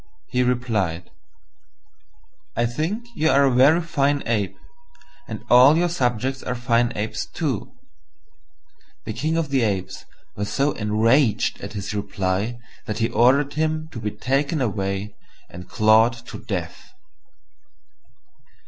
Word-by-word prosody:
he -, -, +1 dB
replied, 110 Hz, -9 st, -1 dB, 1.4 s
"I -, -, +1 dB
think 160 Hz, -, -2 dB
you 160 Hz, +1 st, +2 dB
are 140 Hz, -1 st, +4 dB
a 135 Hz, -, +3 dB
very 140 Hz, +7 st, +5 dB
fine 145 Hz, -3 st, 0 dB
Ape, 110 Hz, -4 st, -1 dB, 0.7 s
and -, -, -7 dB
all 130 Hz, +5 st, +7 dB
your 175 Hz, +1 st, +2 dB
subjects 130 Hz, -4 st, -1 dB
are 125 Hz, -, -3 dB
fine 120 Hz, -1 st, +1 dB
Apes 105 Hz, +1 st, -3 dB
too." 140 Hz, -, -3 dB, 1.3 s
The -, -, -4 dB
King 160 Hz, +2 st, -1 dB
of 165 Hz, -3 st, -1 dB
the 135 Hz, -2 st, +1 dB
Apes 100 Hz, -5 st, -2 dB, 0.3 s
was 105 Hz, +1 st, -3 dB
so 140 Hz, +2 st, +1 dB
enraged 110 Hz, +4 st, +1 dB
at -, -, -7 dB
his 100 Hz, 0 st, -5 dB
reply 100 Hz, +2 st, -2 dB, 0.3 s
that 105 Hz, -, -3 dB
he 115 Hz, +1 st, 0 dB
ordered 135 Hz, +5 st, +3 dB
him 155 Hz, +1 st, -1 dB
to 115 Hz, -, -7 dB
be 105 Hz, -1 st, -2 dB
taken 140 Hz, +7 st, -1 dB
away 100 Hz, -3 st, -2 dB, 0.4 s
and 90 Hz, +1 st, -10 dB
clawed 110 Hz, +2 st, +4 dB
to -, -, -8 dB
death. 95 Hz, -, -6 dB
120 Hz, 130 wpm, -22 LUFS, 105-140 Hz, 1.4 s, all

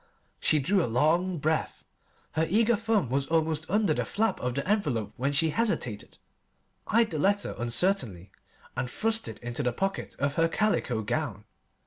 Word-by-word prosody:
She 155 Hz, -, +3 dB
drew 180 Hz, +6 st, +2 dB
a -, -, -2 dB
long 170 Hz, +8 st, +2 dB
breath. 155 Hz, +1 st, -1 dB, 0.5 s
Her 160 Hz, +1 st, 0 dB
eager 225 Hz, +5 st, +4 dB
thumb 215 Hz, -, 0 dB
was 135 Hz, +1 st, 0 dB
almost 160 Hz, -1 st, 0 dB
under 205 Hz, -3 st, +2 dB
the -, -, -1 dB
flap 225 Hz, +2 st, 0 dB
of 125 Hz, -1 st, -2 dB
the 140 Hz, -, -2 dB
envelope 150 Hz, -, 0 dB
when 135 Hz, +3 st, 0 dB
she 155 Hz, +3 st, +2 dB
hesitated, 150 Hz, -, -1 dB, 0.7 s
eyed 230 Hz, 0 st, +3 dB
the 155 Hz, -, -2 dB
letter 200 Hz, +5 st, +1 dB
uncertainly, 120 Hz, -, 0 dB, 0.4 s
and 125 Hz, -, -2 dB
thrust 225 Hz, -, 0 dB
it -, -, -7 dB
into 120 Hz, +3 st, -3 dB
the 125 Hz, -3 st, +1 dB
pocket 195 Hz, +9 st, -3 dB
of 140 Hz, 0 st, 0 dB
her 165 Hz, 0 st, +4 dB
calico 165 Hz, -, 0 dB
gown. 110 Hz, -4 st, -3 dB
160 Hz, 165 wpm, -28 LUFS, 125-200 Hz, 0.7 s, eager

